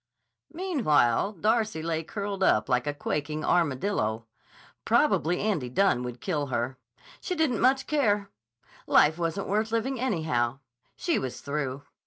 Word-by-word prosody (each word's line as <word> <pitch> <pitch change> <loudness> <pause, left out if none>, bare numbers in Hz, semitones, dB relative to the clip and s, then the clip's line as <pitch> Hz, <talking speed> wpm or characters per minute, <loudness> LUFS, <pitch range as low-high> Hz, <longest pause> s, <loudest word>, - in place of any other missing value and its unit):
Meanwhile 215 - +1
Darcy 215 -3 0
lay 165 -1 -1
curled 200 +2 -5
up 105 - +3
like 125 +2 +1
a 145 - 0
quaking 150 +1 -3
armadillo. 130 - 0 0.6
Probably 175 +4 +2
Andy 190 - -1
Dunne 190 -2 +2
would 125 -1 -6
kill 150 -6 -1
her. 125 +1 -2 0.4
She 365 - -3
didn't 310 -8 +1
much 265 +1 +3
care. 210 -9 +1 0.6
Life 155 +3 +4
wasn't 170 +3 -2
worth 215 +2 0
living, 230 +3 -1
anyhow. 155 - 0 0.4
She 340 -3 0
was 130 - -5
through. 140 -1 -3
165 Hz, 135 wpm, -27 LUFS, 135-215 Hz, 0.6 s, Life